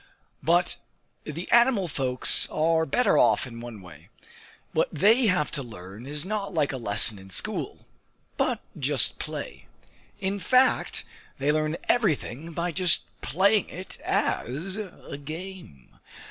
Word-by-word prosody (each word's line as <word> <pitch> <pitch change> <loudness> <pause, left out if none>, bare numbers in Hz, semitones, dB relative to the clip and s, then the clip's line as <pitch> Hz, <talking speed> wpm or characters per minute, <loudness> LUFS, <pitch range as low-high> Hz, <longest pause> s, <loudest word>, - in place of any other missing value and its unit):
But 175 +2 +2 0.5
the 160 +4 -5
animal 235 -5 +5
folks 130 -4 +3
are 160 +1 +2
better 250 - +3
off - - +4
in 115 -2 -9
one 115 -4 -9
way: 85 0 -14 0.6
what - - +2
they 225 +4 +4
have 180 -7 +1
to 140 - -2
learn 110 -1 -10
is 150 +3 -3
not 200 -2 -3
like 150 -3 +2
a 135 - -4
lesson 105 -2 -1
in 95 0 -13
school, 95 - -2 0.5
but - - 0 0.2
just - - +1
play. - - -6 0.5
In 195 +1 -2
fact 255 +5 +3 0.3
they 145 +2 +2
learn 155 +1 0
everything 165 - 0
by 170 +2 -2
just 180 +1 +2 0.2
playing 200 +5 +2
it 185 +3 -7
as 155 - -1
a 190 -8 -7
game! 160 - -9
160 Hz, 135 wpm, -26 LUFS, 125-190 Hz, 0.6 s, animal